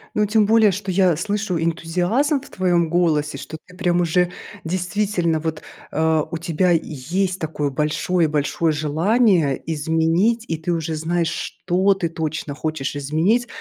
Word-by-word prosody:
Ну 210 - +3
тем 210 +1 +3
более, 220 -1 +5
что 195 +1 -4
я 185 -2 +3
слышу 200 +2 -2
энтузиазм 180 - 0
в 285 - -14
твоём 175 -3 +1
голосе. 155 -4 +1
Что 160 - -8
ты 180 - -17
прям 175 -2 +1
уже 175 +1 +2 0.4
действительно 180 -1 0
вот, 160 0 -4 0.3
э, 160 0 +2
у 165 - -3
тебя 170 +2 +1
есть 175 +4 -1
такое 155 -3 -2
большое-большое 155 +1 0
желание 160 - +2
изменить, 165 +9 +1
и 165 - -1
ты 160 +3 -3
уже 165 -1 -2
знаешь, 165 +2 0
что 185 +4 0
ты 180 -3 -2
точно 155 -2 -4
хочешь 150 -3 -3
изменить. 165 - +1
170 Hz, 145 wpm, -21 LUFS, 155-190 Hz, 0.4 s, более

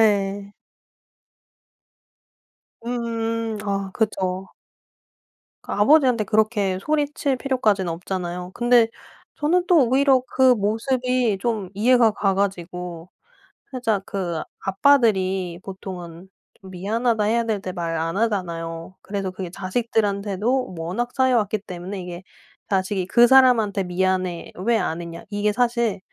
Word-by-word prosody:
예. 200 -1 +1 2.3
음음음. 230 -2 -2
아, 195 -1 -2
그죠. 190 -4 -1 1.1
그 - - -8
아버지한테 250 0 +4
그렇게 210 -3 +1
소리칠 290 -2 0
필요까지는 215 -10 0
없잖아요. 180 +1 -5
근데 240 -1 +4 0.5
저는 350 +4 +1
또 310 -9 +5
오히려 265 0 +4
그 260 -1 +4
모습이 240 +1 0
좀 215 -6 -2
이해가 235 +2 +4
가 200 -1 0
가지고. 180 -3 -3 0.6
살짝 225 -6 -1
그 175 -5 -3 0.2
아빠들이 190 -6 +2
보통은 185 -2 -9 0.3
좀 190 -1 -12
미안하다 215 +4 0
해야 230 +2 +2
될 215 -3 -1
때 185 -1 -5
말 170 -2 -3
안 165 +3 -2
하잖아요. 170 -5 -2
그래서 195 -2 -4
그게 185 -2 -6
자식들한테도 205 +3 -1
워낙 190 +10 -3
쌓여 260 -2 +3
왔기 210 0 -1
때문에 185 +1 -7
이게 180 0 -7 0.5
자식이 190 -1 0
"그 240 +4 +6
사람한테 235 -7 +5
미안해 185 -1 -1
왜 235 0 +3
안 165 -5 -2
했냐." 170 -1 -8
이게 205 +1 0
사실 235 -3 +1
205 Hz, 260 characters per minute, -23 LUFS, 185-235 Hz, 2.3 s, 그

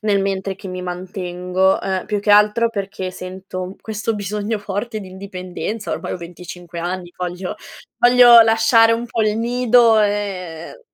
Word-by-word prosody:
nel 205 -2 +1
mentre 195 0 -2
che 195 - -9
mi 185 0 -5
mantengo. 180 +1 -1
Uhm, 190 -1 -2
più 210 -1 -1
che 205 - 0
altro 210 +3 +4
perché 195 -3 -4
sento 185 0 -7
questo 220 +1 -3
bisogno 210 +2 -3
forte 205 +3 -4
di 190 - -9
indipendenza, 190 +3 -6
ormai - - -4
ho - - -3
25 175 0 -10
anni, 175 0 -4
voglio 180 0 -4 0.4
voglio 245 -1 +8
lasciare 225 0 +5
un 235 +1 -2
po' 225 -1 -1
il 215 0 +1
nido 235 -1 +4
e 200 - -3
200 Hz, 155 wpm, -19 LUFS, 185-220 Hz, 0.4 s, voglio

